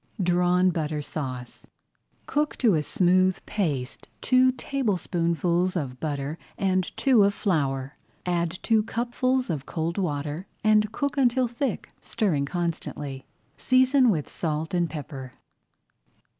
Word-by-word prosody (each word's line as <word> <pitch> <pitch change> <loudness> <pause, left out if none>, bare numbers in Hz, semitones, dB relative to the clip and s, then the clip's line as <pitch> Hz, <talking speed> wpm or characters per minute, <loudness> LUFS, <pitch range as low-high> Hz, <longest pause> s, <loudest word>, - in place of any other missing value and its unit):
DRAWN 180 +1 +3
BUTTER 155 -2 -2
SAUCE 130 -5 -6 0.6
Cook 295 +1 0
to 230 -6 +4
a 155 - +2
smooth 185 +4 +3
paste 145 -11 -3
two 255 0 +4
tablespoonfuls 180 - 0
of 130 -7 -3
butter 145 0 -3 0.2
and 185 -2 +1
two 255 -7 +5
of 200 0 +2
flour. 140 -7 -1 0.3
Add 175 -1 0
two 225 -2 +3
cupfuls 245 +1 -1
of 145 -4 -4
cold 165 +3 -2
water 150 0 -3 0.2
and 215 0 +4
cook 285 +4 -2
until 255 -1 +3
thick, 240 0 -3
stirring 170 -11 0
constantly. 150 -5 -4 0.3
Season 255 0 +4
with 155 -9 0
salt 160 0 -3
and 175 -2 +1
pepper. 140 -4 -7
180 Hz, 120 wpm, -26 LUFS, 150-220 Hz, 0.6 s, two